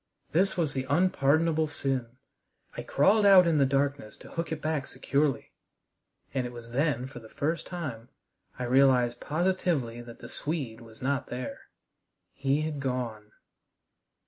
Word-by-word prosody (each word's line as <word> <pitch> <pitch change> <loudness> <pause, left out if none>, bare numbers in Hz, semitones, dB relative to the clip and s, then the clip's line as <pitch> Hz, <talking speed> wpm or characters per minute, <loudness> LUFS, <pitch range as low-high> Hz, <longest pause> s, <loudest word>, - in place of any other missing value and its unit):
This 190 +4 +2
was 155 -4 0
the 130 -1 -3
unpardonable 160 0 +3
sin. 130 -4 -3 0.6
I - - -4
crawled 200 +10 +3
out 195 -3 +8
in 165 -3 +3
the 135 - +4
darkness 140 -4 -1
to - - -13
hook 165 -1 -3
it 160 - -2
back 155 -3 -2
securely, 140 -1 0 0.8
and 130 -3 0
it - - -8
was 120 -1 -10
then 130 -1 +1
for 135 - -9
the 110 -1 -14
first 160 +8 -2
time 140 -10 -6 0.5
I 125 - -3
realized 125 -1 +4
positively 155 -8 0
that 120 -1 -11
the 120 - -10
Swede 130 -5 -4
was 115 +2 -13
not 140 0 0
there. 125 0 -6 0.7
He 140 +2 0
had 155 -2 -3
gone. 120 -5 -3
140 Hz, 150 wpm, -28 LUFS, 125-155 Hz, 0.8 s, out